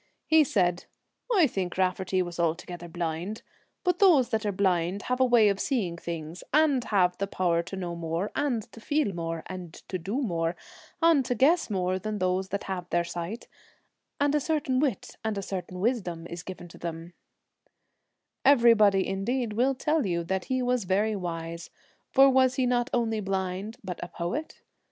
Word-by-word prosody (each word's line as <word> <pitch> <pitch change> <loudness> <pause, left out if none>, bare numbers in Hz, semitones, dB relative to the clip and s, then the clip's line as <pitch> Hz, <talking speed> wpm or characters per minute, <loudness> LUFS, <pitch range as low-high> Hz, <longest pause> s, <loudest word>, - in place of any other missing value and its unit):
He 315 -1 +6
said, 180 -9 +1 0.2
' - - -7
I 350 - +7
think 190 -9 -3
Raftery 185 0 +1
was 175 -1 -7
altogether 170 +1 -2
blind, 170 +5 -4 0.4
but 360 -1 +1
those 325 -11 +5
that 220 -1 -1
are - - +1
blind 185 -1 0
have 250 0 -1
a 260 - +5
way 240 -4 +5
of 200 -1 +1
seeing 215 - -1
things, 165 0 -6
and 290 -4 +3
have 180 -4 +2
the 200 - -1
power 175 -3 +1
to 170 - -7
know 175 -2 -4
more, 170 +4 -3
and 245 -7 0
to - - -12
feel 290 -6 0
more, 165 -1 -4
and 180 -3 -8
to 185 - -2
do 200 +10 -2
more, 170 -9 -1 0.5
and 330 -5 +5
to 245 - -1
guess 305 +7 +3
more 185 -2 0
than 215 +3 -3
those 185 0 0
that 200 +1 -3
have 180 -2 -5
their 175 0 +2
sight, 175 +6 -5 0.7
and 285 0 +2
a 300 - +3
certain 290 -3 0
wit 265 -8 -2
and 220 -2 -1
a 200 - -3
certain 185 -1 -5
wisdom 185 -7 -1
is 170 0 -6
given 180 -1 -8
to - - -14
them/ 170 0 -6 1.3
Everybody, 230 -7 +5
indeed, 215 +4 -1
will 255 +5 +2
tell 300 -1 +1
you 170 -2 -1
that 190 +2 -2
he 255 -1 -1
was 250 -4 0
very 205 +4 +1
wise, 170 -2 -5 0.4
for 270 0 +7
was 260 -1 +4
he 260 - +1
not 245 +1 +1
only 225 -2 0
blind 190 +2 -3
but 180 -3 -5
a - - -4
poet? 180 - -5
195 Hz, 185 wpm, -27 LUFS, 175-250 Hz, 1.3 s, I